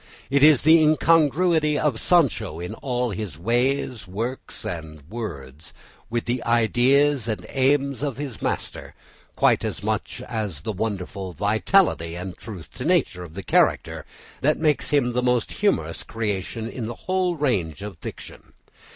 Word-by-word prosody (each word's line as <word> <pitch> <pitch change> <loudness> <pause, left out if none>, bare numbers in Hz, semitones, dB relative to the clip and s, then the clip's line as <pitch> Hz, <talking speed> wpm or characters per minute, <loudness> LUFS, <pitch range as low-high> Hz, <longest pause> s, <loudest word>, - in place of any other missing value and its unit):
It 140 0 +3
is 150 -2 +6
the 160 +2 +7
incongruity 155 0 +3
of 140 -8 0
Sancho 115 - +2
in 90 +1 -5
all 125 -3 -2
his 100 -6 -5
ways, 120 +3 0
words, 115 +8 -5
and 80 -3 -6
works, 80 - -7 0.3
with 120 0 -2
the 120 0 -1
ideas 120 +3 +3
and 110 -2 -3
aims 140 0 +1
of 140 -4 -2
his 135 -7 -6
master, - - -3 0.4
quite - - +3
as - - -4
much - - -2
as 105 -10 -3
the 110 - -3
wonderful 95 -2 -4
vitality 105 - +2
and 90 +1 -6
truth 100 -8 -10
to - - -4
nature 90 0 +1
of 85 -2 -11
the 100 - -6
character, - - +2 0.4
that 150 +3 +2
makes 155 -2 +1
him 130 -5 +2
the 125 - +1
most 125 -2 +1
humorous - - 0
creation 110 0 -3
in 115 -1 -5
the 120 - -5
whole 185 -1 +1
range 100 - -1
of 100 -6 -8
fiction. - - -10
120 Hz, 150 wpm, -24 LUFS, 95-140 Hz, 0.4 s, the